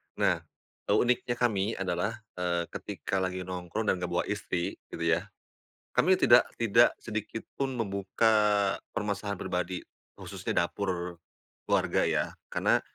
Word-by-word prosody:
Nah, - - +2 0.5
eee, 100 - +4
uniknya 120 +1 +2
kami 110 -3 +1
adalah, 95 +4 -2 0.2
eee, 85 -1 +1
ketika 95 - -3
lagi 95 0 -2
nongkrong 90 +3 -3
dan 95 - -1
enggak 90 - -2
bawa - - +1
istri, 85 -1 -2
gitu 85 - -5
ya. 85 +4 +2 0.7
Kami 190 0 +4
tidak 120 -9 +6
tidak 115 +1 +5
sedikit 110 0 -5
pun 135 -1 0
membuka 100 0 +1 0.6
permasalahan 100 -1 -2
pribadi, 90 0 -3 0.3
khususnya - - -5
dapur 90 -2 -3 0.5
keluarga, - - +2
ya. - - +2 0.2
Karena, - - +2
100 Hz, 130 wpm, -29 LUFS, 90-115 Hz, 0.7 s, tidak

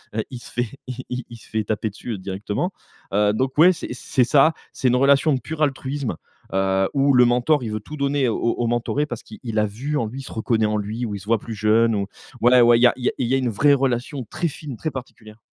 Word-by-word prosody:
heu, 110 - 0
il 125 - -6
se - - -13
fait, 120 0 -1 0.2
il 130 0 -6
il 125 0 -3
il 120 - -9
se - - -18
fait 110 -1 -1
taper 110 +1 -1
dessus 105 +1 -6
directement. 100 - -3 0.4
Heu 105 0 +3
donc, 130 +5 -1
ouais 175 +4 +8
c'est - - -7
c'est 125 +1 0
ça, 150 +5 +5 0.2
c'est 130 - 0
une 125 - +3
relation 140 +3 +4
de 130 - 0
pur 160 -1 -6
altruisme, 135 - -1 0.4
heu, 95 0 +1
où 140 0 +3
le 125 - +7
mentor, 125 +4 +2
il 110 - -4
veut 110 - -2
tout 150 +8 -9
donner 140 -2 +1
au 110 - -1 0.2
au 120 - 0
mentoré, 120 +5 0
parce 120 -6 -7
qu'il 110 - -12
il 110 -3 -1
a 105 - +3
vu 130 +9 -3
en 120 - 0
lui, 125 +5 -7
il - - -10
se - - -10
reconnaît 110 0 +1
en 105 0 0
lui, 110 +4 -3
ou 105 -3 -4
il - - -5
se 95 - -13
voit 115 +1 +2
plus 115 - -7
jeune 110 +2 +3
ou, 100 - -1 0.4
voilà, 120 +1 +6
ouais, - - +4
ouais 120 0 +6
il - - +2
y 125 - +9
a - - +2
il 125 - -6
y - - +4
a - - -2
il 125 - -1
y 125 - 0
a - - +3
une 130 -2 0
vraie 140 +7 +4
relation 130 0 -1
très 170 - -1
fine, 145 -3 -7
très 155 - -3
particulière. 115 -4 -10
120 Hz, 280 wpm, -22 LUFS, 110-135 Hz, 0.4 s, y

